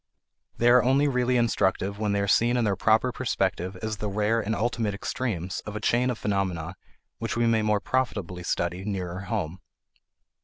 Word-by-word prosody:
They 120 Hz, -, +2 dB
are 125 Hz, 0 st, +7 dB
only 135 Hz, +3 st, +3 dB
really 125 Hz, -2 st, +1 dB
instructive 100 Hz, -3 st, +1 dB
when 105 Hz, -1 st, 0 dB
they 100 Hz, 0 st, +1 dB
are 100 Hz, -, -1 dB
seen 120 Hz, +5 st, +3 dB
in 120 Hz, -, +2 dB
their 100 Hz, -3 st, +1 dB
proper 110 Hz, +5 st, +3 dB
perspective 95 Hz, -7 st, -1 dB
as 110 Hz, -1 st, -2 dB
the 105 Hz, 0 st, -3 dB
rare 105 Hz, +3 st, +1 dB
and 110 Hz, +1 st, -1 dB
ultimate 110 Hz, -1 st, -1 dB
extremes 100 Hz, -5 st, -3 dB
of 105 Hz, -, -8 dB
a -, -, -2 dB
chain 120 Hz, +4 st, +2 dB
of 125 Hz, -, -2 dB
phenomena 95 Hz, -5 st, -2 dB, 0.4 s
which 115 Hz, 0 st, -3 dB
we 120 Hz, -, +2 dB
may 115 Hz, -1 st, +3 dB
more 105 Hz, -1 st, +2 dB
profitably 100 Hz, -9 st, -2 dB
study 85 Hz, +1 st, -2 dB
nearer 95 Hz, -3 st, -3 dB
home. 95 Hz, -3 st, -3 dB
105 Hz, 185 wpm, -26 LUFS, 95-120 Hz, 0.4 s, are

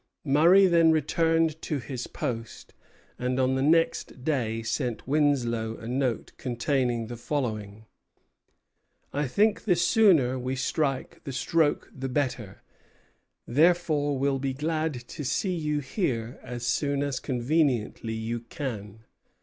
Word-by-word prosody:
Murray 165 Hz, +8 st, +6 dB
then 170 Hz, -3 st, +5 dB
returned 160 Hz, +1 st, +1 dB
to 150 Hz, -, -2 dB
his 125 Hz, -2 st, -5 dB
post, 115 Hz, -2 st, -5 dB, 0.5 s
and 125 Hz, +1 st, -1 dB
on 130 Hz, 0 st, +2 dB
the 130 Hz, -, 0 dB
next 155 Hz, -3 st, +1 dB
day 115 Hz, -7 st, -1 dB
sent 120 Hz, 0 st, -3 dB
Winslow 120 Hz, -6 st, +1 dB
a 115 Hz, -, -9 dB
note 125 Hz, -1 st, -1 dB
containing 120 Hz, -1 st, 0 dB
the 120 Hz, +2 st, -7 dB
following: 110 Hz, -5 st, -4 dB, 1.3 s
"I 145 Hz, 0 st, 0 dB
think 210 Hz, -, +2 dB
the 185 Hz, -5 st, +4 dB
sooner 170 Hz, -, +4 dB
we 130 Hz, +1 st, -2 dB
strike 135 Hz, +1 st, -2 dB
the 140 Hz, -, -5 dB
stroke 145 Hz, +4 st, +1 dB
the 130 Hz, 0 st, -4 dB
better, 125 Hz, -7 st, -3 dB, 0.8 s
therefore 150 Hz, -1 st, +2 dB
will 135 Hz, 0 st, +1 dB
be 135 Hz, 0 st, -2 dB
glad 155 Hz, +1 st, -1 dB
to 150 Hz, -, -6 dB
see 180 Hz, +8 st, 0 dB
you 150 Hz, -3 st, -1 dB
here 130 Hz, -, -2 dB
as 120 Hz, -1 st, -6 dB
soon 140 Hz, +2 st, 0 dB
as 140 Hz, -2 st, -2 dB
conveniently 125 Hz, -4 st, 0 dB
you 115 Hz, +1 st, -3 dB
can. 110 Hz, -4 st, -6 dB
135 Hz, 130 wpm, -27 LUFS, 120-155 Hz, 1.3 s, Murray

